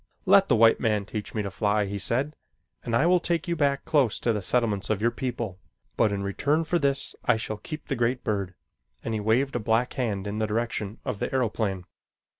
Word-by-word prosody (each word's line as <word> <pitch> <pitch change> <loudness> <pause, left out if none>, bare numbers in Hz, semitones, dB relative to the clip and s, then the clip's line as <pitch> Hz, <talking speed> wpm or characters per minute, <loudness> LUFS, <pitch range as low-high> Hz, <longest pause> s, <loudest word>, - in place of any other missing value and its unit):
"Let 195 -1 +5
the 125 - +5
white 115 0 +5
man 105 -4 0
teach 105 +2 -6
me 105 - 0
to 100 - -4
fly," 105 +1 +1
he 100 +1 -4
said, 135 +9 +2 0.5
"and 115 -2 -2
I 145 - +3
will 180 +1 +4
take 170 -1 -1
you 170 - 0
back 140 -3 0
close 140 -8 +2
to 115 - +2
the 105 - -2
settlements 105 -1 0
of 110 -3 +1
your 115 +2 +2
people, 120 -7 -4 0.4
but 110 -3 +3
in 100 -1 -2
return 145 +11 0
for 170 +2 0
this 140 -2 -1
I 125 - +4
shall 110 -1 -4
keep 155 +8 -8
the 135 - -2
great 120 +1 0
bird," 100 -4 -2 0.5
and 115 - -3
he 110 - -1
waved 120 +6 +1
a - - +1
black 115 +3 +1
hand 105 -7 -2
in 105 +1 -3
the 110 - 0
direction 110 -1 -2
of 125 -7 -3
the - - -2
aeroplane. 110 -7 -1
115 Hz, 225 wpm, -26 LUFS, 105-135 Hz, 0.5 s, Let